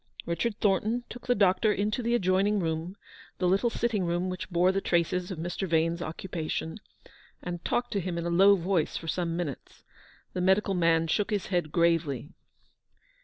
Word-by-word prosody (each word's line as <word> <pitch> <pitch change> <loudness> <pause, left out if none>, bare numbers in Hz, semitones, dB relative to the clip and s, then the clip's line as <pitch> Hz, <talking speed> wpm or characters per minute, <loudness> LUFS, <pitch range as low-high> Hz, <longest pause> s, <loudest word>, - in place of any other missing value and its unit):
Richard 205 +6 -1
Thornton 215 +4 +1
took 245 - -10
the 245 - +3
doctor 200 +1 +3
into 210 +4 -1
the 235 0 +1
adjoining 195 0 +2
room, 165 +2 -3 0.4
the 180 - +1
little 195 +6 +3
sitting 230 -4 -1
room 175 +2 -1
which 185 - -6
bore 180 +1 +3
the 195 +1 -1
traces 175 +1 0
of 185 - -5
Mr. 175 +4 -3
Vane's 165 +1 +1
occupation, 160 +1 -4 0.6
and 175 -1 -5
talked 245 0 -1
to 200 - 0
him 180 -1 -3
in 170 - -3
a 170 - -1
low 195 +4 +6
voice 180 -3 0
for 165 - -8
some 170 0 -1
minutes. 155 -7 -6 0.5
The 180 - -2
medical 190 +2 +3
man 165 -2 +3
shook 200 +6 0
his 205 -3 -1
head 175 -4 0
gravely. 165 -4 +1
180 Hz, 175 wpm, -28 LUFS, 170-200 Hz, 0.6 s, low